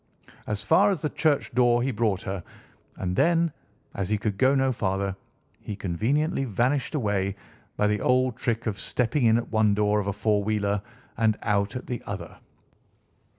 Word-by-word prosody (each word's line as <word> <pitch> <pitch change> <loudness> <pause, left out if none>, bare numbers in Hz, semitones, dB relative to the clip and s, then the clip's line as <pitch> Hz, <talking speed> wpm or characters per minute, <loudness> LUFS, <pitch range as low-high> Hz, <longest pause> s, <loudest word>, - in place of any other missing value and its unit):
As 105 0 -2
far 200 - +5
as 190 -7 -1
the 150 - -1
church 155 -3 +1
door 120 -1 +3
he 135 - 0
brought 105 -4 0
her, 95 -2 -4 0.5
and 90 -1 -2
then, 170 - +3 0.4
as 95 -1 -3
he 105 - +2
could 105 -1 -2
go 130 +2 +4
no 135 -1 +2
farther, 100 -4 -1 0.4
he 105 - -6
conveniently 125 - 0
vanished 125 +5 0
away 100 -6 0 0.4
by 105 - +2
the 105 0 +1
old 130 -1 +2
trick 115 -1 -2
of 105 -4 -2
stepping 125 +5 0
in 115 0 +5
at 120 - -4
one 110 -2 +3
door 105 0 +2
of 100 - -3
a 100 - 0
four 105 0 +1
wheeler 100 -1 0 0.4
and 110 -1 +2
out 100 +1 0
at 125 - -5
the 120 -2 -4
other. - - -6
110 Hz, 180 wpm, -26 LUFS, 100-130 Hz, 0.5 s, far